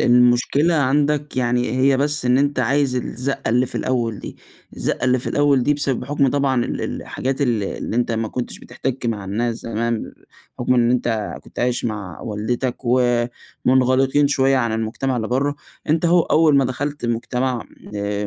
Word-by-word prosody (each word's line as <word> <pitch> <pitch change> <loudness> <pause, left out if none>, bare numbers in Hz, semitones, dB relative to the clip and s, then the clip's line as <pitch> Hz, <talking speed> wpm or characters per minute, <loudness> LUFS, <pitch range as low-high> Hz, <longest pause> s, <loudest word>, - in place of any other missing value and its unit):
المشكلة 125 +6 +4
عندك 145 0 +1
يعني 125 -1 +1
هي 135 +1 +4
بس 145 +1 0
إن 125 +1 +4
أنت 145 0 +1
عايز 130 +1 +1
الزَّقة 130 +1 -3
اللي 125 +3 +3
في - - -3
الأول 115 -4 -1
دي، - - -8 0.4
الزَّقة - - -1
اللي 125 0 +3
في - - -6
الأول 145 -3 +3
دي 145 - +2
بسبب 140 -3 -1
حُكم 140 0 +1
طبعًا 135 -3 +1
ال - - -3
ال - - -3
الحاجات 135 +2 -3
الل 120 -6 +1
اللي 100 - -4
أنت 120 -1 +1
ما 110 0 -1
كنتش 125 +2 -5
بِتِحتَك 130 -2 -4
مع 105 -4 -2
الناس 115 +5 -1
زمان، 115 0 -3 0.5
حُكم 125 +1 +1
إن 120 -1 +3
أنت 115 -4 0
كنت - - -13
عايش 125 0 0
مع 105 -6 -4
والدتك، 120 +4 -2 0.9
ومُنغلقين 130 +2 +3
شوية 135 -1 +3
عن 115 -3 0
المجتمع 115 +4 -2
اللي 110 -2 -2
بره. 140 +3 0 0.3
أنت 155 +2 +2
أهو، 175 +1 +5
أول 155 -3 +4
ما 135 - +4
دخلت 145 +2 -3
المجتمع 120 +1 -1 0.3
آآ، 100 0 -2
125 Hz, 175 wpm, -21 LUFS, 120-140 Hz, 0.9 s, أهو